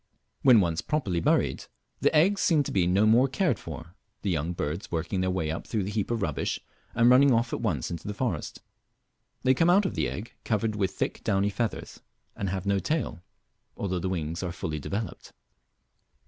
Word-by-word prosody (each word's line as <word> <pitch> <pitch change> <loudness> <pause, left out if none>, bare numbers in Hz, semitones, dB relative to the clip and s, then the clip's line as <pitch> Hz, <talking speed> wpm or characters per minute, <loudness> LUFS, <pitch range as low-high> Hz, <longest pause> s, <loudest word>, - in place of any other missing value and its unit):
When 125 -5 +7
once 85 -2 0
properly 115 - -1
buried - - +1 0.3
the - - +3
eggs 190 +6 +4
seem 155 -4 +3
to - - -5
be 90 -3 +2
no 95 +4 +3
more 120 +5 +5
cared 140 - 0
for, 80 +1 -9 0.3
the 100 - 0
young 80 0 -1
birds 85 +4 -4
working 85 +3 -1
their 95 - +1
way 80 -4 -1
up 80 - -5
through 110 -4 -1
the 100 - -4
heap 105 -2 -1
of 115 -3 -1
rubbish, 75 -5 -1 0.4
and 115 - +4
running 135 +2 +6
off 115 0 +1
at - - -2
once 90 - -1
into 85 +1 -6
the 105 - -4
forest. 105 -10 -3 0.8
They 130 - +5
come 165 +6 +3
out 195 +3 +5
of - - -1
the - - 0
egg 110 +5 -7
covered 110 -1 0
with 100 -2 +1
thick - - -3
downy 100 +1 +1
feathers, 115 +1 -4 0.3
and 100 - -2
have 95 0 -3
no 100 0 +2
tail, 140 - -2 0.6
although 95 -3 -2
the 95 - -2
wings 85 -1 -3
are 90 -2 -3
full 80 - -5
developed. 95 +7 -5
100 Hz, 200 wpm, -27 LUFS, 85-120 Hz, 0.8 s, When